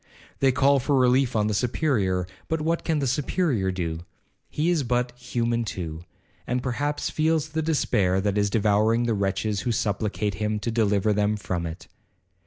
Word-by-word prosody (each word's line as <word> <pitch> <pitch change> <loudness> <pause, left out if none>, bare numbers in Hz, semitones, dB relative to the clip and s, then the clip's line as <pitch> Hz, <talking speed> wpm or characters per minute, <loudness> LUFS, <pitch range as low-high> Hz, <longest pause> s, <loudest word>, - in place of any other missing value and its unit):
They 135 -1 +4
call 140 +1 +3
for 135 +2 +1
relief 125 0 +3
on 105 -1 +2
the 105 - 0
Superior, 105 - 0 0.2
but 160 - -1
what 165 +2 -1
can 160 -2 0
the 140 - 0
Superior 130 - 0
do? 85 -3 -3 0.5
He 160 +4 0
is 170 -4 +2
but 125 -1 0
human 120 -1 -2
too, 85 -5 -5 0.4
and 125 0 -1
perhaps 145 +4 -2
feels 160 -1 +1
the 160 +1 -2
despair 105 - +1
that 100 0 0
is 100 -1 +2
devouring 110 +2 +2
the 120 -1 +1
wretches 100 +1 -1
who 120 - -1
supplicate 105 -1 -1
him 105 +1 -1
to 115 - -2
deliver 105 -2 +2
them 105 +1 +1
from 90 -4 -3
it. 80 +1 -9
115 Hz, 175 wpm, -25 LUFS, 100-135 Hz, 0.5 s, They